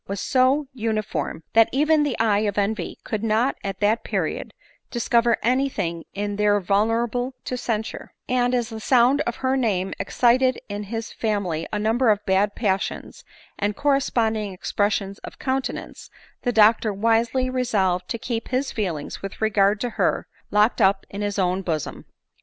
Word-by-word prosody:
£1 - - -40
was 200 0 -3
so 265 +5 +2
uniform, 215 - -2
that 225 0 +6
even 305 +3 +3
the 290 -5 0
eye 215 -3 +3
of 210 -1 -1
envy 210 +2 -1
could 215 -1 -3
not 225 +4 +2
at 195 -1 -4
that 215 +3 +2
period - - -2 0.4
discover 235 -1 +2
any 260 +4 +2
thing 170 -8 -3
in 205 0 -2
her 205 0 +3
vulnerable 225 +6 0
to 255 - -2
cen 225 -3 -1
sure; - - -9 0.2
and, 250 0 +1
as 240 -2 -1
the 225 -1 -6
sound 255 +4 +4
of 240 - -1
her 260 0 0
name 195 -7 0
excited 255 +1 +3
in 205 0 -5
his 225 +2 -5
fam 210 -3 -1
ily 165 -2 -3
a 210 - -1
number 225 +4 +2
of 210 -1 +2
bad 195 +2 +2
passions 195 -4 -2 0.4
and 205 0 0
corresponding 230 -7 +1
expres 205 +3 0
sions 200 0 -3
of - - -10
countenance, 260 -1 -4 0.3
the 245 - 0
doctor 220 0 +4
wisely 230 +5 +1
resolved 195 -9 0
to 230 - -2
keep 230 0 -4
his 260 +2 -1
feelings, 175 -9 -4
with 195 0 -7
regard 205 -1 +2
to 245 +2 -2
her, - - 0 0.2
locked 210 +3 +3
up 195 0 +3
in 200 - -5
his 205 -1 -2
own 185 0 +1
bo 170 -4 0
som. 150 - -8
220 Hz, 175 wpm, -23 LUFS, 200-245 Hz, 0.4 s, that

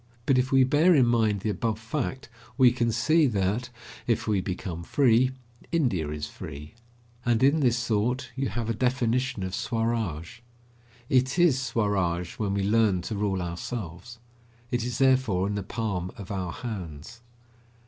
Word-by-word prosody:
But 130 -2 +3
if 130 +1 0
we 135 -1 +6
bear 150 +7 +4
in 130 -4 +5
mind 110 -4 +2
the 110 - -1
above 110 0 -1
fact 130 +4 -4 0.3
we 130 -3 +6
can 120 -1 0
see 150 +8 +3
that, 105 +3 -1 0.4
if 115 -1 0
we 105 -3 +2
become 90 -2 -5
free, 125 +5 +3 0.4
India 120 - +1
is 75 0 -4
free. 75 +1 -9 0.5
And 120 0 +2
in 140 +4 +4
this 125 -3 +2
thought 125 +4 0
you 135 0 -1
have 115 -2 -3
a 115 - 0
definition 125 -1 0
of 95 0 -4
Swaraj. 115 -6 -2 0.7
It 130 +3 +2
is 165 -7 +4
Swaraj 100 -8 -1
when 100 -2 -1
we 100 - 0
learn 105 -3 +2
to 110 - -4
rule 100 -3 -1
ourselves. 90 +4 -6 0.5
It 120 -1 0
is 120 -1 -3
therefore 130 -8 +3
in 100 - -1
the 100 - -2
palm 100 -4 -3
of 100 -1 -8
our 95 -3 -3
hands. 95 -1 -7
115 Hz, 160 wpm, -27 LUFS, 95-125 Hz, 0.7 s, we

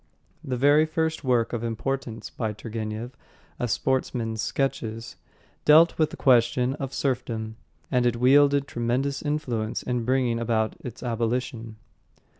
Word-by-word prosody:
The 130 -1 -3
very 145 +4 +5
first 160 0 -1
work 125 -3 +1
of 115 -1 -2
importance 115 0 -3
by 110 -3 -3
Turgenev, 110 +2 -5 0.5
A 120 - 0
Sportsman's 115 -2 -1
Sketches, 115 -4 -2 0.5
dealt 160 +3 +6
with 155 - +3
the - - -9
question 125 0 +3
of 135 -2 -4
serfdom, 115 -5 -2 0.4
and 125 -2 +3
it 120 - +1
wielded 140 +3 +4
tremendous 125 +4 -1
influence 125 -8 -2
in 125 -2 -1
bringing 125 -1 +1
about 110 -2 0
its 125 -2 -8
abolition. 115 -1 -2
125 Hz, 130 wpm, -25 LUFS, 115-135 Hz, 0.5 s, dealt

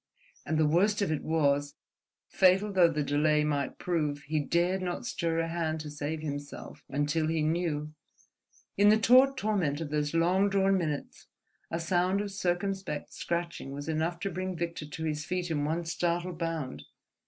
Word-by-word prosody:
And 160 - 0
the 155 - +4
worst 200 +7 +3
of 170 - -1
it 155 - -1
was, 145 -3 +1 0.5
fatal 190 +2 +3
though 180 -3 +6
the 150 -2 -1
delay 150 +1 +2
might 145 -3 -1
prove, 150 -5 -1
he 155 +1 -1
dared 175 +5 +1
not 180 +5 -3
stir 165 -7 -1
a 165 0 0
hand 165 -1 -2
to 150 -1 -7
save 150 +2 -4
himself 145 -2 -7
until 145 +3 0
he 160 -1 0
knew.... 155 -2 -1 0.8
In 205 +1 +6
the 215 - +6
taut 255 +5 +5
torment 195 - 0
of 160 -3 -5
those 150 +1 -1
long 185 +4 +3
drawn 195 0 +3
minutes 155 -6 -3 0.4
a 165 - -2
sound 180 +3 +1
of 205 -1 -3
circumspect 190 -3 -2
scratching 170 -5 -3
was 145 +2 -6
enough 160 +2 -1
to 195 - -2
bring 185 0 -3
Victor 170 -2 -4
to 155 +2 -6
his 150 -1 -2
feet 180 +1 -2
in 145 -2 0
one 165 +3 -1
startled 175 +1 -1
bound. 165 -5 -3
165 Hz, 175 wpm, -29 LUFS, 150-185 Hz, 0.8 s, though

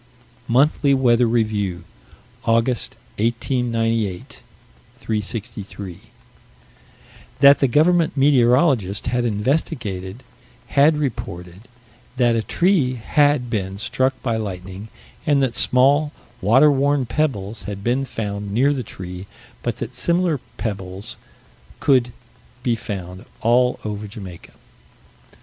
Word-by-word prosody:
Monthly 140 +3 +3
Weather 120 -2 +3
Review, 105 -6 -1 0.6
August, 115 +1 +1 0.2
1898 115 -4 -1 0.5
363: 105 -3 -5 1.4
That 140 0 +7
the 135 - +3
government 160 +5 +3
meteorologist 125 - +3
had 120 0 0
investigated: 110 - -2 0.5
had 150 +2 +4
reported 95 - -5 0.5
that 120 -2 +3
a 115 - +1
tree 160 - +1
had 145 +2 +2
been 95 -4 -3
struck 130 +4 -1
by 115 -4 0
lightning, 95 -1 -6 0.4
and 140 -2 +3
that 130 -3 0
small 140 +4 +3 0.3
water 130 +10 +5
worn 140 -1 +1
pebbles 115 -6 -2
had 100 -1 -6
been 125 +4 +1
found 105 -5 -4
near 135 +7 +3
the 135 - -3
tree: 90 -3 -8 0.3
but - - -3
that - - -6
similar 170 -3 +1 0.2
pebbles 95 -3 -5 0.6
could 125 -3 +3 0.5
be 120 -2 +1
found 95 -2 -7 0.2
all 125 +2 +3
over 105 0 -4
Jamaica. 95 -4 -10
120 Hz, 105 wpm, -21 LUFS, 100-135 Hz, 1.4 s, That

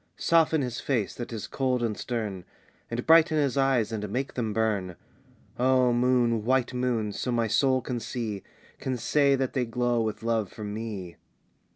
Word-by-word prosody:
"Soften 160 -3 +3
his 120 -2 -4
face, 115 -9 -1
that 120 - -7
is 110 -3 -5
cold 130 -2 -1
and 110 -2 -1
stern, 105 -7 -4 0.5
And 120 +1 -3
brighten 160 -1 +6
his 140 -3 +1
eyes 135 -5 +2
and 105 -2 -3
make 130 +6 -3
them 115 -3 -2
burn, 105 -5 -1 0.6
"O 130 -1 +3
moon, 120 -2 +2
white 130 +1 +1
moon, 120 -4 -1
so 125 - -3
my 120 -1 +1
soul 130 +4 +2
can 125 0 -3
see, 110 -4 -4 0.4
Can 130 -1 -2
say 140 +3 +3
that 130 -1 -2
they 130 - +1
glow 120 0 0
with 110 0 -3
love 115 -4 0
for 110 - -9
me!" 105 -4 -6
120 Hz, 175 wpm, -27 LUFS, 110-130 Hz, 0.6 s, brighten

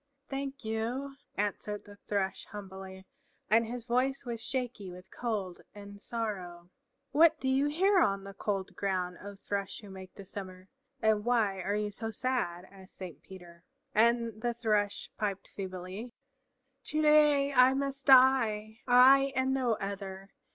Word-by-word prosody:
"Thank 275 -2 -5
you," 245 +6 -3 0.2
answered 205 0 -2
the 205 - -13
Thrush 200 -1 -2
humbly, 190 -2 -9 0.5
and 225 +1 +4
his 240 0 -6
voice 255 +3 0
was 235 -1 -4
shaky 250 -7 -3
with 180 +1 -12
cold 205 -7 -3
and 200 0 -11
sorrow. 185 -7 -5 0.4
"What 325 +2 +5
do 265 - -3
you 270 +2 +3
here 375 +6 +3
on 195 - +2
the 195 0 -9
cold 195 -1 -3
ground, 185 -3 -2
O 200 +1 -8
Thrush 200 0 -4
who 205 -2 -11
make 190 -1 -11
the 200 - -10
summer, 185 -1 -8 0.4
and 215 -1 +3
why 215 -5 +1
are 200 +3 -1
you 210 0 -1
so 225 +2 -5
sad?" 220 -7 -2
asked 190 -1 -15
Saint 170 -6 -8
Peter. 175 -2 -13 0.3
And 230 0 +2
the 240 0 -1
Thrush 210 -3 0
piped 200 -2 -2
feebly, 190 +4 -7 0.7
"To 305 +1 -1
day 295 -2 +5
I 255 0 +6
must 275 0 -3
die, 230 -5 +5
I 265 +2 +7
and 260 0 +1
no 255 -3 +1
other! 195 -1 -6
215 Hz, 150 wpm, -31 LUFS, 195-255 Hz, 0.7 s, I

